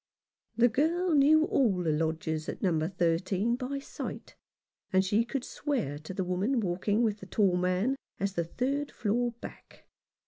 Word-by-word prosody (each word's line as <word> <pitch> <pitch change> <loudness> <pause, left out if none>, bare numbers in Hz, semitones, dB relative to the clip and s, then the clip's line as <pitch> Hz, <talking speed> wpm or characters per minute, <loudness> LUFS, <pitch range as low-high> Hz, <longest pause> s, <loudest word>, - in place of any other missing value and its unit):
The 240 +1 +6
girl 325 +8 +1
knew 305 +2 +5
all 245 - +2
the 160 - +1
lodgers 160 0 -1
at - - -6
No. 160 -4 +2
13 185 +5 0
by 260 +2 -4
sight, 275 - -7 0.6
and 190 0 +3
she 210 +4 +2
could 245 +2 -4
swear 235 - -2
to 155 +4 -9
the 190 0 -2
woman 190 +8 0
walking 205 +3 0
with 215 -2 0
the 190 - -10
tall 195 -3 +2
man 185 +8 +1 0.2
as 200 0 -1
the 170 - 0
third 275 - -2
floor 235 +3 0
back. - - -11
205 Hz, 165 wpm, -29 LUFS, 180-260 Hz, 0.6 s, The